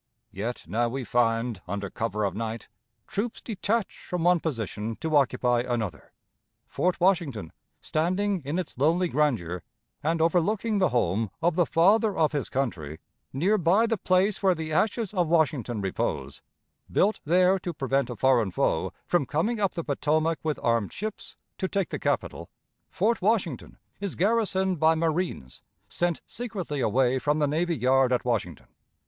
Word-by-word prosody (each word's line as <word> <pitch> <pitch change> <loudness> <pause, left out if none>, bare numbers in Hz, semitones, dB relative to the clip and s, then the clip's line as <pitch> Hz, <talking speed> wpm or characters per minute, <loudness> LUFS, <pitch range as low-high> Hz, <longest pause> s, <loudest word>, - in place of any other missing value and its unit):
Yet 115 +5 -4
now 115 +6 0
we 130 +2 -4
find, 115 -3 0
under 100 +1 -4
cover 110 -1 -2
of 100 -3 0
night, 115 +1 -4 0.4
troops 220 +3 -3
detached 220 0 -2
from 180 -2 -4
one 175 0 +4
position 115 - -3
to 160 -1 -1
occupy 125 -3 +3
another. 115 -10 -3 0.5
Fort 180 0 -1
Washington, 165 - +1 0.3
standing 185 +4 0
in 145 +5 -2
its 180 -4 -4
lonely 170 +6 +3
grandeur, 110 - 0 0.4
and 160 +3 0
overlooking 195 +6 +1
the 185 -4 +3
home 110 -3 0
of 170 +1 +2
the 175 0 +2
Father 205 +5 +3
of 155 -2 +3
his 145 -3 -2
Country, 85 - -3 0.3
near 190 +10 +2
by 185 +7 +4
the 225 0 +1
place 185 +1 +1
where 190 -2 +3
the 160 -1 -5
ashes 215 +4 0
of 180 -4 +1
Washington 140 -9 +1
repose, 70 -7 -3 0.5
built 210 +3 +2
there 180 +4 +4
to 175 - -4
prevent 135 -3 0
a 120 - -4
foreign 120 -4 +3
foe - - 0
from 175 -7 +1
coming 210 +10 0
up 200 -2 0
the 170 - -3
Potomac 155 +2 0
with 155 -2 -2
armed 115 -4 +1
ships 215 +1 -6 0.2
to 190 - 0
take 195 -2 -1
the - - -4
capital - - -2 0.4
Fort 220 +4 0
Washington 185 - 0 0.2
is 200 -3 -4
garrisoned 190 -3 +1
by 160 +1 +4
marines 160 - -2 0.3
sent 175 -2 -1
secretly 205 - -5
away 130 +2 +2
from 150 +3 +1
the 150 -1 +2
navy 165 +3 0
yard 130 0 +3
at 125 - +1
Washington. 105 - -2
155 Hz, 160 wpm, -27 LUFS, 120-185 Hz, 0.5 s, one